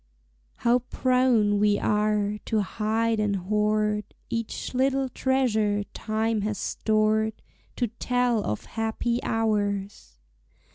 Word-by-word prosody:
How 240 +1 +2
prone 250 -4 +2
we 205 0 +3
are 210 0 +1
to 220 -1 +1
hide 220 +2 0
and 210 -1 +1
hoard 210 +2 +1 0.3
Each 230 +1 -3
little 265 +1 +1
treasure 220 -6 +1
time 220 0 -1
has 210 0 -2
stored, 220 0 0 0.4
To 245 - 0
tell 240 0 0
of 105 - -3
happy 225 +2 -1
hours! 205 - -1
215 Hz, 105 wpm, -26 LUFS, 210-235 Hz, 0.4 s, we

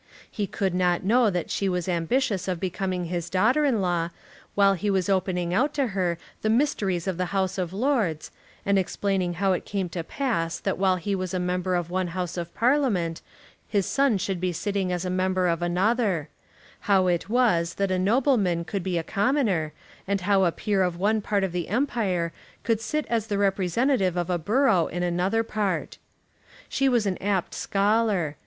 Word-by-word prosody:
He 205 -2 -2
could 190 -1 -1
not 180 -1 +1
know 230 +3 +4
that 180 -3 -3
she 195 - 0
was 180 -1 -2
ambitious 190 +5 0
of 180 -2 -1
becoming 185 0 -2
his 175 0 -3
daughter 225 +12 +3
in 240 -7 +2
law, 175 -2 0 0.5
while 200 -1 +5
he 195 +3 -2
was 190 -1 +1
opening 180 -2 0
out 285 +9 +1
to 275 -4 +1
her 180 -3 0 0.2
the 215 - 0
mysteries 210 - +1
of 190 -3 -2
the 180 0 -1
House 190 0 0
of 175 -2 -2
Lords, 210 - 0 0.3
and 200 0 +3
explaining 190 -1 -1
how 195 +2 +2
it 180 - -2
came 195 -3 -3
to 170 0 -4
pass 165 -7 -2
that - - -2
while 190 -1 +3
he 190 +3 -3
was 185 -1 -2
a - - 0
member 180 +1 -1
of 175 -1 -2
one 185 0 0
House 180 -2 -2
of 170 -1 -4
Parliament, 230 - +1 0.5
his 200 -3 +1
son 275 -6 +2
should 190 -1 -3
be 185 -1 0
sitting 195 +1 -2
as 180 0 -2
a - - -1
member 185 0 +1
of 170 -1 0
another; 185 - +1 0.6
how 190 -2 +5
it 175 +1 0
was 215 -9 +2
that 195 -1 0
a 185 - +1
nobleman 200 -5 +2
could 200 +2 -3
be 180 -1 -1
a 165 - -1
commoner, 200 - +1 0.4
and 200 0 0
how 195 0 +3
a 170 - +3
peer 200 +2 0
of 180 -2 0
one 210 +4 +1
part 200 -1 0
of 190 - -1
the 175 -1 -3
Empire 200 - 0 0.3
could 225 -2 +1
sit 305 +6 -2
as 225 -2 -1
the 205 -2 -1
representative 195 +1 +1
of 175 0 -1
a 175 - 0
borough 205 - +3
in 175 0 -3
another 180 +6 +1
part. 210 -3 -2 0.7
She 275 0 +1
was 240 -4 +2
an 190 -2 -1
apt 195 -2 -1
scholar. 200 -6 +1
190 Hz, 195 wpm, -25 LUFS, 180-215 Hz, 0.7 s, while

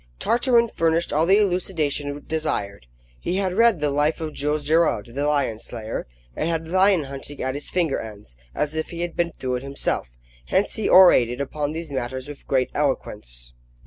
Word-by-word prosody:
Tartarin 235 - +3
furnished 165 -4 0
all 155 +3 +2
the 195 +2 +6
elucidation 160 -7 -1
desired. 100 - -2 0.3
He 175 - -2
had 190 -2 0
read 230 -2 +4
"The 145 -1 +1
Life 145 +2 +1
of 155 -2 -4
Jules 150 +1 -1
Gerard, 150 -8 +2
the 140 +3 -1
Lion 140 -7 0
Slayer," 110 - -5 0.3
and 165 - -1
had 165 -1 -2
lion 185 -1 +4
hunting 140 +1 -8
at 130 0 -1
his 145 +1 -4
finger 170 -6 0
ends, 105 - -10 0.2
as 150 0 -1
if 160 0 -3
he 170 0 -6
had 175 -1 -3
been 170 0 0
through 130 -4 -3
it - - -7
himself. 135 - -3 0.3
Hence 195 +2 +1
he 220 - -1
orated 125 -10 +6
upon 145 +2 -2
these 165 -1 -6
matters 130 0 -4
with 145 -1 -10
great 130 -2 +1
eloquence. - - -3
150 Hz, 180 wpm, -23 LUFS, 130-170 Hz, 0.3 s, the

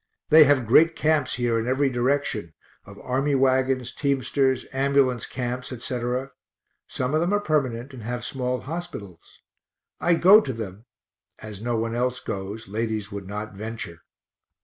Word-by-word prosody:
They 155 0 +9
have 135 -3 +3
great 160 +9 +5
camps 155 -3 +1
here 120 -2 +1
in 115 - -3
every 135 +2 +2
direction, 125 -7 -1 0.3
of - - -12
army 135 +3 0
wagons, 130 -1 +1
teamsters, 135 -1 0
ambulance 135 -3 +2
camps, 125 0 -4
etc.; 125 +2 -3 0.6
some 130 +2 -2
of 155 - +2
them 175 +3 +1
are - - +2
permanent, 135 - -1
and 125 - -9
have 120 +2 -4
small 125 -1 -2
hospitals. 150 - -8 0.6
I 175 - +3
go 195 +6 +7
to 130 - -4
them 110 -1 -7 0.5
(as 105 -2 -9
no 120 0 -1
one 115 +1 -2
else 125 +1 -1
goes; 100 +3 -6
ladies 110 0 -3
would 100 -2 -6
not 105 +1 -5
venture). 105 -5 -7
125 Hz, 150 wpm, -25 LUFS, 115-140 Hz, 0.6 s, They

